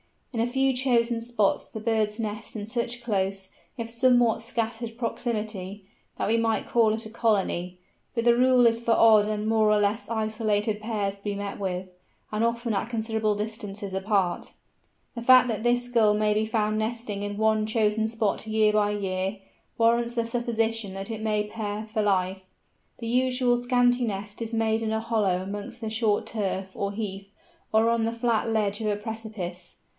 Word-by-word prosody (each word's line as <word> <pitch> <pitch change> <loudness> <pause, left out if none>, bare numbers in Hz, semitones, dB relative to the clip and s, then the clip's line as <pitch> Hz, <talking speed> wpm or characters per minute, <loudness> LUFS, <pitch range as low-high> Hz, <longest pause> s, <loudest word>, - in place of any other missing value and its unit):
In 230 - -2
a 230 - +2
few 265 +2 +2
chosen 240 -2 +2
spots 230 -4 0
the 220 - -8
birds 220 -2 0
nest 215 -1 -5
in 205 -2 -4
such 235 +2 -3
close, 195 -3 -1 0.3
if 230 -1 -4
somewhat 240 -1 +3
scattered 230 0 -3
proximity, 215 -5 -4 0.3
that - - -1
we 230 - +3
might 225 -1 0
call 225 -2 +3
it 225 +1 -1
a - - -7
colony, 195 -6 0 0.4
but 230 - 0
the 235 0 +5
rule 250 0 +5
is 230 0 +4
for 235 -1 +1
odd 220 -2 +6
and 215 0 -2
more 220 -1 +3
or 210 - +4
less 205 +3 0
isolated 215 -1 0
pairs 210 -3 -2
to 200 - -23
be 205 -1 -2
met 200 0 -5
with, 185 -1 -3 0.4
and 215 +1 0
often 235 0 -1
at 200 +3 -1
considerable 220 -2 0
distances 210 -2 -5
apart. 190 -2 0 0.6
The 235 - -5
fact 255 +1 +6
that 220 -1 -2
this 245 0 +2
Gull 220 -3 +4
may 210 0 +2
be 215 +1 +1
found 215 -1 0
nesting 220 -2 -3
in 205 0 -4
one 215 0 +2
chosen 220 0 +1
spot 220 -1 -1
year 215 -1 +3
by 210 -1 +2
year, 195 0 -2 0.4
warrants 235 +1 +2
the 235 -1 0
supposition 225 -3 -1
that 195 +3 -5
it 220 -1 -5
may 215 -1 +1
pair 210 0 -4
for 215 0 -1
life. 190 -2 +1 0.6
The 230 - -5
usually 250 0 +2
scanty 245 0 +3
nest 205 0 -5
is 230 0 -4
made 225 0 +1
in 220 -1 -1
a 220 - 0
hollow 210 -5 +1
amongst 205 +5 -6
the 220 - -3
short 220 -2 +1
turf, 195 -3 -2
or 200 0 -3
heath, 200 -2 -5 0.4
or 220 +1 +4
on 230 -1 +1
the 230 - -1
flat 230 -1 0
ledge 210 -2 0
of 215 - -1
a 210 - +1
precipice. 210 -5 -6
220 Hz, 185 wpm, -26 LUFS, 205-230 Hz, 0.6 s, odd